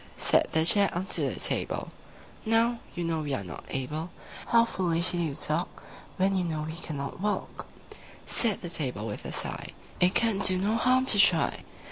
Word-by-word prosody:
II - - -22
Said - - +2
the 160 0 +2
Chair 200 +3 +5
unto 185 +3 -1
the - - -7
Table, - - -2 0.5
"Now, 230 +1 +1 0.2
you 175 - -3
know 165 -1 -2
we 145 -3 -3
are 100 - -5
not 90 -6 -10
able: 150 +6 -4 0.4
How 230 0 +4
foolishly 175 -3 0
you 145 -3 -4
talk, 155 +5 -1 0.3
When 195 +1 +1
you 185 - 0
know 155 -3 -3
we 160 +1 -6
cannot 145 -4 -5
walk!" 205 +2 -4 0.6
Said 220 -6 +2
the 175 - -5
Table 125 -10 -3
with 105 -2 -7
a - - -5
sigh, - - -4 0.3
"It 180 +1 +3
can 225 -4 +2
do 185 -2 +7
no 200 +4 0
harm 255 +2 +2
to 215 -6 +3
try. 180 -4 +3
175 Hz, 185 wpm, -27 LUFS, 155-205 Hz, 0.6 s, do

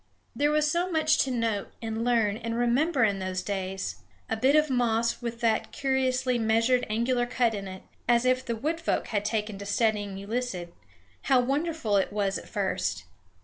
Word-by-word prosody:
There 290 +1 +2
was 300 0 +2
so 350 +2 0
much 315 -2 +2
to - - -4
note 230 -5 -1
and 225 0 -3
learn 230 -4 +2
and 230 0 -4
remember 255 +4 +2
in 200 -3 +2
those 185 -1 -3
days! 190 -1 -3 0.3
A - - +2
bit 260 +6 +3
of 305 0 +4
moss 235 -3 +1
with 235 0 -5
that 225 -2 +1
curiously 260 -2 0
measured 230 +3 +2
angular 240 +3 +1
cut 240 -2 +1
in 200 -2 -5
it, 185 0 -9 0.3
as 240 0 +4
if 255 0 +2
the 235 -3 -2
wood 310 +8 -2
folk - - -1
had 205 -2 0
taken 210 -1 -2
to 200 - -7
studying 205 -2 0
Euclid, 200 -4 -4 0.5
how 265 -2 +4
wonderful 275 -3 0
it 195 - +1
was 200 -2 0
at - - -14
first! 185 - -1
230 Hz, 185 wpm, -27 LUFS, 205-255 Hz, 0.5 s, of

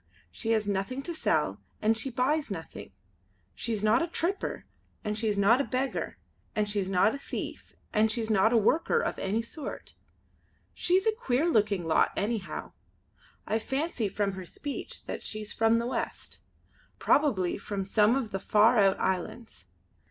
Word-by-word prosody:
She 225 - -1
has 215 -2 +1
nothing 205 +7 -2
to 340 - -4
sell 125 - 0 0.2
and 220 +1 +3
she 225 +4 -1
buys 265 +4 0
nothing. 165 -5 -7 0.6
She's 220 -3 -3
not 215 +3 +4
a 335 - 0
tripper, 345 +3 -2 0.4
and 210 0 -2
she's 215 -1 0
not 220 +6 +5
a - - 0
beggar, 265 0 -2 0.4
and 210 -1 +1
she's 205 -2 -1
not 195 +3 +3
a 280 - -5
thief, - - -6 0.2
and 215 +1 +4
she's 225 -1 -2
not 215 +2 +4
a 240 - +4
worker 315 - +3
of - - -2
any 210 +4 0
sort. 290 +5 -5 0.8
She's 370 +3 +2
a 445 - +4
queer 320 - 0
looking 210 - +2
lot 160 - +3
anyhow. 210 -1 -3 0.7
I 220 - 0
fancy 265 -3 -1
from 200 0 0
her 190 -1 -7
speech 280 +10 -6
that - - -5
she's 215 -1 -4
from 225 0 +3
the 235 - -1
west; 250 - -4 0.6
probably 210 - +2
from 200 -1 -4
some 210 +4 +4
of 250 -6 -2
the 195 - -2
far 215 +4 +4
out 195 -1 +4
islands. 190 - -3
220 Hz, 165 wpm, -29 LUFS, 200-260 Hz, 0.8 s, not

